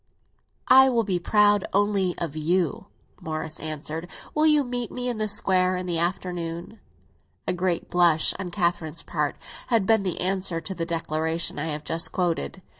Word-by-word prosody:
"I 265 Hz, +1 st, +8 dB
will 235 Hz, -3 st, +2 dB
be 190 Hz, -4 st, 0 dB
proud 205 Hz, +1 st, +3 dB
only 200 Hz, -2 st, +1 dB
of 165 Hz, -3 st, -4 dB
you," 165 Hz, +1 st, 0 dB, 0.3 s
Morris 155 Hz, 0 st, -4 dB
answered. 155 Hz, +2 st, -5 dB, 0.2 s
"Will 305 Hz, +1 st, +3 dB
you 300 Hz, -2 st, +5 dB
meet 245 Hz, -2 st, -4 dB
me 250 Hz, 0 st, -3 dB
in 235 Hz, -3 st, -3 dB
the 215 Hz, -, 0 dB
Square 185 Hz, -2 st, +1 dB
in 180 Hz, -, -4 dB
the 170 Hz, -2 st, -1 dB
afternoon?" 175 Hz, +2 st, -3 dB, 0.7 s
A -, -, +1 dB
great 180 Hz, -1 st, -1 dB
blush 170 Hz, -3 st, +4 dB
on 190 Hz, -2 st, -4 dB
Catherine's 170 Hz, -2 st, -1 dB
part 150 Hz, -3 st, -1 dB, 0.3 s
had 230 Hz, -5 st, +2 dB
been 220 Hz, 0 st, +4 dB
the 185 Hz, -3 st, -2 dB
answer 185 Hz, -2 st, -1 dB
to 165 Hz, +4 st, -6 dB
the 165 Hz, -3 st, -4 dB
declaration 160 Hz, -1 st, -1 dB
I 155 Hz, -, -2 dB
have 150 Hz, -1 st, -3 dB
just 165 Hz, +1 st, 0 dB
quoted. 180 Hz, +1 st, -2 dB
180 Hz, 170 wpm, -25 LUFS, 165-205 Hz, 0.7 s, I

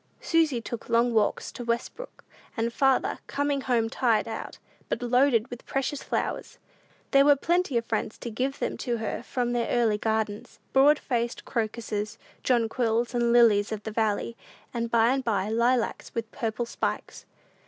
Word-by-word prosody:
Susy 320 Hz, -7 st, +2 dB
took 230 Hz, 0 st, -7 dB
long 235 Hz, +1 st, +3 dB
walks 215 Hz, -2 st, +1 dB
to 245 Hz, -, -7 dB
Westbrook, 235 Hz, -, -4 dB, 0.3 s
and 230 Hz, +1 st, -1 dB
farther, 270 Hz, 0 st, +2 dB
coming 285 Hz, 0 st, -1 dB
home 240 Hz, -3 st, +1 dB
tired 230 Hz, -2 st, +1 dB
out, 225 Hz, -1 st, -6 dB, 0.3 s
but -, -, -1 dB
loaded 245 Hz, -1 st, +3 dB
with 245 Hz, -, -8 dB
precious 270 Hz, +1 st, -2 dB
flowers. -, -, -3 dB, 0.5 s
There 275 Hz, 0 st, +6 dB
were 290 Hz, 0 st, +6 dB
plenty 345 Hz, -2 st, +1 dB
of 230 Hz, -, -1 dB
friends 220 Hz, -, -2 dB
to 235 Hz, -, -6 dB
give 260 Hz, +5 st, -2 dB
them -, -, -2 dB
to 240 Hz, -2 st, -2 dB
her 220 Hz, -1 st, -3 dB
from 240 Hz, 0 st, -2 dB
their 240 Hz, -1 st, 0 dB
early 225 Hz, -3 st, +2 dB
gardens: 220 Hz, -1 st, -2 dB, 0.2 s
broad 285 Hz, +3 st, +6 dB
faced 235 Hz, -3 st, -2 dB
crocuses, 220 Hz, -2 st, -3 dB, 0.2 s
jonquils, 235 Hz, -1 st, +1 dB
and 235 Hz, -1 st, +2 dB
lilies 225 Hz, -4 st, +5 dB
of 215 Hz, -1 st, -4 dB
the 220 Hz, -, -5 dB
valley, 220 Hz, +1 st, -1 dB, 0.4 s
and 235 Hz, -1 st, -2 dB
by 230 Hz, +1 st, +4 dB
and 270 Hz, -1 st, -1 dB
by 205 Hz, -4 st, 0 dB
lilacs, 235 Hz, +2 st, 0 dB
with 230 Hz, -1 st, -3 dB
"purple 225 Hz, +1 st, -2 dB
spikes." 235 Hz, -, -4 dB
235 Hz, 165 wpm, -27 LUFS, 225-255 Hz, 0.5 s, There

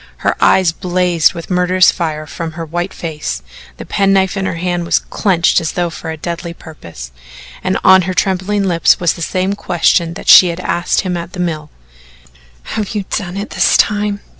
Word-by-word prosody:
Her -, -, +2 dB
eyes 185 Hz, -3 st, +4 dB
blazed 180 Hz, -1 st, +1 dB
with 170 Hz, +2 st, -8 dB
murderous 180 Hz, +1 st, +4 dB
fire 155 Hz, -3 st, -4 dB
from 165 Hz, +1 st, -6 dB
her 165 Hz, 0 st, -6 dB
white 175 Hz, +4 st, -3 dB
face, 150 Hz, -, -5 dB, 0.3 s
the -, -, -8 dB
penknife 195 Hz, -1 st, +1 dB
in 190 Hz, -1 st, -2 dB
her -, -, -3 dB
hand 175 Hz, 0 st, -2 dB
was 170 Hz, -, +2 dB
clenched 175 Hz, -4 st, +1 dB
as 160 Hz, -, -3 dB
though 175 Hz, -1 st, -1 dB
for 165 Hz, -, -8 dB
a 160 Hz, -, -5 dB
deadly 170 Hz, +1 st, -5 dB
purpose, 85 Hz, -, -11 dB, 0.5 s
and 185 Hz, +1 st, 0 dB
on 190 Hz, 0 st, +7 dB
her 185 Hz, -, -3 dB
trembling 195 Hz, +2 st, 0 dB
lips 175 Hz, -3 st, +3 dB
was 175 Hz, -3 st, +1 dB
the 170 Hz, -, -10 dB
same 185 Hz, +3 st, -1 dB
question 170 Hz, -3 st, +1 dB
that -, -, -10 dB
she 185 Hz, -, +9 dB
had 170 Hz, 0 st, -4 dB
asked 175 Hz, -1 st, 0 dB
him 185 Hz, -2 st, -3 dB
at 170 Hz, 0 st, -6 dB
the 185 Hz, -, -8 dB
mill: 155 Hz, -4 st, -3 dB, 1.0 s
"Have 210 Hz, -1 st, -3 dB
you 205 Hz, -2 st, -2 dB
done 190 Hz, -2 st, -3 dB
it 200 Hz, -, -5 dB
this -, -, +3 dB
time?" 205 Hz, -1 st, 0 dB
175 Hz, 190 wpm, -15 LUFS, 165-190 Hz, 1.0 s, she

